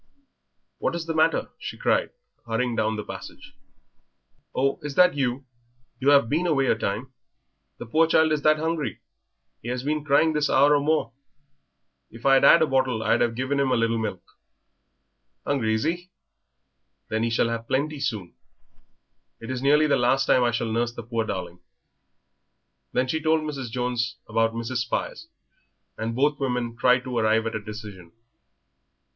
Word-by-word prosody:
"What - - -1
is 170 -1 -4
the 165 - -3
matter?" 160 +1 +2
she - - -7
cried, - - +1 0.4
hurrying 115 +1 -1
down 110 0 0
the 105 - -4
passage. - - -10 1.0
"Oh, 135 +1 0
is 150 -2 -6
that 180 0 +5
you? 135 -1 -2 0.5
You 135 +1 +2
have 140 -5 +5
been 165 +8 0
away 140 -5 +2
a 125 - +2
time. 110 +4 -4 0.6
The - - -8
poor 160 +8 +3
child 160 -1 +3
is 150 -1 0
that 155 +1 +4
hungry 160 -1 -2 0.6
he - - -9
has 125 +1 -3
been 150 +1 -1
crying 155 +2 +3
this 150 -1 0
hour 145 +2 +5
or - - +3
more. 150 -5 0 1.0
If 115 +3 -14
I'd 135 -1 +5
'ad 165 - +7
a - - +4
bottle 130 -5 0
I'd 110 - +2
'ave 120 -1 +1
given 130 +3 -1
him 135 -1 +2
a - - +3
little 115 0 +1
milk." 95 -5 -4 1.2
"Hungry, 115 -6 0
is 110 - -1
he? 175 +3 -2 1.0
Then 110 0 -1
he 115 - +1
shall 115 0 +1
have 115 0 -4
plenty 145 +2 -1
soon. 110 -10 -3 1.1
It 115 +3 -7
is 130 -1 -3
nearly 150 +3 +4
the 145 - +2
last 130 +2 +2
time 125 - +3
I 120 - +3
shall 115 -1 -2
nurse 120 +1 0
the 120 -1 -8
poor 115 0 -2
darling." 90 -4 -5 1.3
Then 130 - 0
she 160 +4 -1
told 160 0 +2
Mrs. 140 -5 -5
Jones 120 -1 -2
about 115 +1 0
Mrs. 115 +2 -3
Spires, 115 +1 -3 0.7
and 115 +1 -4
both 145 +3 +1
women 125 -3 -2
tried 125 +1 +3
to 130 -1 -5
arrive 110 0 +2
at 115 - -3
a 110 - -2
decision. 105 -5 -10
125 Hz, 175 wpm, -25 LUFS, 115-145 Hz, 1.3 s, ad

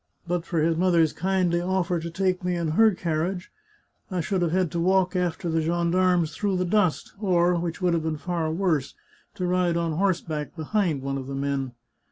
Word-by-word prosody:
But 175 0 -2
for 170 - -2
his 165 +1 +2
mother's 170 -3 +3
kindly 180 -1 +1
oflfer 180 -1 0
to 170 - -5
take 185 +1 -1
me 180 0 0
in 170 -2 -1
her 215 +5 +4
carriage, 175 +2 -2 0.6
I 185 -2 -2
should 185 +3 -1
have 175 - +2
had 180 -2 +1
to 170 - -2
walk 185 +1 +2
after 180 -1 -1
the 165 -1 +1
gendarmes 170 +1 +1
through 200 -3 0
the 180 - 0
dust, 185 -3 +1
or, 180 -3 +3
which 175 +1 -3
would 175 -1 +3
have 165 - +1
been 160 -1 -2
far 165 0 -2
worse, 160 -6 0 0.4
to 180 - -2
ride 180 -1 +1
on 170 -1 0
horseback 165 -4 -1
behind 160 -3 -1
one 135 0 -2
of 130 - -7
the 135 - -5
men. 135 -2 -2
175 Hz, 200 wpm, -25 LUFS, 160-185 Hz, 0.6 s, her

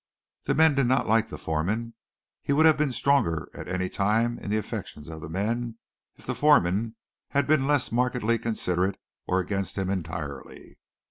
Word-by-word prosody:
The - - +1
men 160 0 +5
did 135 -3 +2
not 130 +2 +2
like 110 +1 +3
the - - -7
foreman. 105 +9 -2 0.5
He 140 - 0
would 155 +3 +4
have 160 -1 +7
been 150 -2 0
stronger 115 - +1
at - - -8
any 95 +1 -1
time 110 +5 +1
in - - -7
the 105 - +1
affections 105 -7 -6
of 80 -1 -8
the 75 - -7
men 115 +6 -2 0.4
if - - -16
the - - -2
foreman 110 -6 +3 0.3
had 140 -1 +1
been 145 -2 +2
less 145 -4 +1
markedly 120 -1 +1
considerate 95 -4 -1 0.3
or 90 - +2
against 100 +1 -3
him 95 -1 -1
entirely. 85 -6 -6
110 Hz, 180 wpm, -26 LUFS, 90-125 Hz, 0.5 s, have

